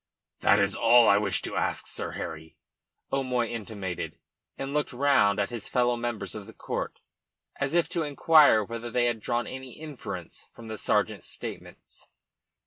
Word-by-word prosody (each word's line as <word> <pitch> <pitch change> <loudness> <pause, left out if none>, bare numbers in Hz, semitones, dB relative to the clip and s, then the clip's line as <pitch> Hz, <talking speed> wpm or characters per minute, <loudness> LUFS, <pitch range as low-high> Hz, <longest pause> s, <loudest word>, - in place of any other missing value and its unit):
"That 100 - +5
is 100 -1 +2
all 120 +1 +6
I 100 0 +6
wish 100 -2 +1
to - - -4
ask, - - -1
Sir - - -5
Harry," 80 -1 -7 0.6
O'Moy 130 -3 +1
intimated, 100 -6 -5 0.4
and 135 +1 -4
looked 150 -2 -1
round 125 -7 +3
at 100 +3 0
his 115 -3 -5
fellow 120 -1 +2
members 115 -5 -3
of 105 -2 -7
that 110 - -14
court - - -4 0.6
as 140 +3 -1
if 175 - +3
to 170 - -1
inquire 150 -5 +5
whether 115 +2 -6
they 120 +1 +1
had 120 -2 0
drawn 120 +3 -1
any 130 -1 -8
inference 120 - -8
from 115 -1 -12
the 110 - -5
sergeant's - - 0
statements. - - -8
120 Hz, 165 wpm, -27 LUFS, 100-130 Hz, 0.6 s, all